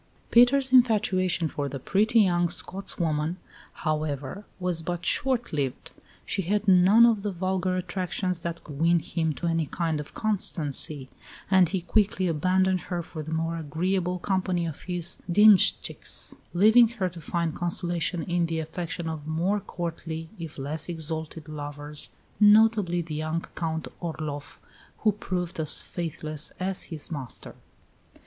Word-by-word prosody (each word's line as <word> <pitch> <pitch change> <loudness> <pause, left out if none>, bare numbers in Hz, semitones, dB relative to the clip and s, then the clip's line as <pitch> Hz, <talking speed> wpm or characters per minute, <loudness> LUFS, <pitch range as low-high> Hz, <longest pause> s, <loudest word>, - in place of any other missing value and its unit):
Peter's 255 +3 +5
infatuation 195 -8 +3
for 145 -2 -3
the 135 - -5
pretty 215 - +3
young 175 -3 +2
"Scotswoman," 170 -2 -1 0.5
however, 155 +3 -2
was 180 -2 0
but 175 +1 -4
short 255 -6 0
lived. 140 -4 -2 0.3
She - - -1
had 205 +3 -1
none 190 +5 +7
of 225 -4 +3
the 205 - -2
vulgar 185 0 -1
attractions 185 0 -2
that 170 0 -5
could 145 -2 -9
win 170 +2 +4
him 160 -2 -1
to - - -5
any 165 -2 +1
kind 165 -1 -1
of 150 - -8
constancy; 155 - -1 0.4
and 185 -3 +5
he 190 0 -1
quickly 190 0 +1
abandoned 185 +3 +2
her 175 -2 -2
for 160 -1 -7
the 155 +1 -7
more 165 +1 -1
agreeable 180 +4 -1
company 185 -2 0
of 160 -3 -6
his 175 -1 -2
dienshtchiks, 210 +1 +4 0.2
leaving 220 +6 +7
her 190 -3 +1
to 170 -1 -8
find 170 0 -1
consolation 175 -1 -2
in 175 -1 0
the 165 0 -2
affection 165 +1 -4
of 155 -2 -5
more 175 +6 0
courtly, 165 -3 -5
if 165 -2 -7
less 150 +4 -3
exalted, 160 -1 -4
lovers 145 0 -5 0.3
notably 210 -4 +5
the 160 -1 -7
young 155 +2 -2
Count 160 -2 -2
Orloff, 155 -4 -5 0.4
who 215 - +4
proved 180 -4 -4
as 155 -2 +1
faithless 155 -3 -5
as 185 0 -2
his 160 0 -7
master. 135 -6 -7
170 Hz, 145 wpm, -27 LUFS, 160-190 Hz, 0.5 s, none